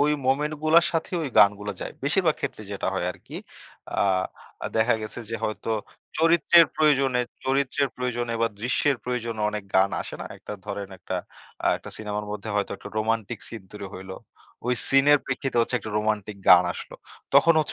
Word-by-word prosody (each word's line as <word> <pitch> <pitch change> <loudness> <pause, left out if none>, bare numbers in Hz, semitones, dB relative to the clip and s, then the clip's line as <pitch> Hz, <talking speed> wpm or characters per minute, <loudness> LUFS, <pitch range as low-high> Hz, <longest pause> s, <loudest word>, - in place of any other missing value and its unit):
ওই 150 +1 +4 0.2
মোমেন্ট 150 +3 +1
গুলার 165 +2 +6
সাথে 165 -1 -1
ওই 145 - -2
গানগুলা 100 +1 +4
যায়। - - -5
বেশিরভাগ 160 +3 +2
ক্ষেত্রে 130 -6 -4
যেটা 100 - -3
হয় 90 -2 -1
আরকি। - - -10 0.6
আ 95 -1 -2
দেখা 110 +2 +4
গেছে 110 - -7
যে 115 - -1
হয়তো 110 +1 -3 0.5
চরিত্রের 170 0 +6
প্রয়োজনে 135 -5 +3 0.2
চরিত্রের 135 +1 +1
প্রয়োজনে 120 -2 -2
বা 115 - +3
দৃশ্যের 130 +3 +1
প্রয়োজনে 115 -3 -3
অনেক 105 -1 -5
গান 95 +1 +5
আসে - - -8
না? - - -4
একটা - - -8
ধরেন, 100 -1 -4
একটা - - -4 0.5
আ - - +3
একটা - - -10
সিনেমার 105 -1 -4
মধ্যে 105 +1 -5
হয়তো 100 -1 0
একটা - - -10
রোমান্টিক 110 +1 -1
সিন 115 -4 -7
তৈরি 105 -1 -7
হইলো। 95 0 -8 0.5
ওই 125 - +2
সিনের 140 +2 +6
প্রেক্ষিতে 135 -1 -2
হচ্ছে 120 +2 0
একটা 110 - -7
রোমান্টিক 105 -1 -1
গান 90 0 +9
আসলো। - - -9 0.4
তখন 165 - +7
হচ্ছে 155 - 0
115 Hz, 175 wpm, -25 LUFS, 105-140 Hz, 0.6 s, গান